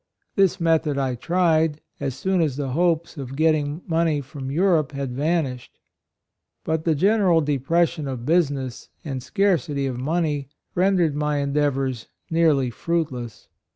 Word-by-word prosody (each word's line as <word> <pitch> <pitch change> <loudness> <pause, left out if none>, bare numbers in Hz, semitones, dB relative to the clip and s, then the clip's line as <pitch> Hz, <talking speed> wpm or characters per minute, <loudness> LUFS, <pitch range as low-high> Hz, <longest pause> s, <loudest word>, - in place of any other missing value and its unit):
This 195 -2 +3
method 160 -3 +2
I 135 -2 0
tried, 160 +2 +1 0.2
as 135 -3 -3
soon 190 +2 0
as 150 -5 0
the 140 -1 -3
hopes 170 +3 0
of 135 -1 -6
getting 155 +1 +1
money 165 -3 +1
from 135 -1 -7
Eu 155 +7 0
rope 160 -7 +2
had 140 -2 -3
vanished. 140 -3 -2 0.9
But 160 0 -1
the 160 -2 +3
gene 205 +8 +3
ral 175 -4 +4
depression 155 +2 0
of 125 -3 -5
business 140 -6 0 0.2
and. 135 -4 -4
scarcity 155 -6 0
of 130 -2 -3
money 150 -1 -1 0.2
rendered 180 -5 +2
my 150 -1 0
en 140 0 -2
deavors 135 -5 0 0.2
nearly 155 -6 +3
fruitless. 130 -7 -3
150 Hz, 150 wpm, -23 LUFS, 135-170 Hz, 0.9 s, ral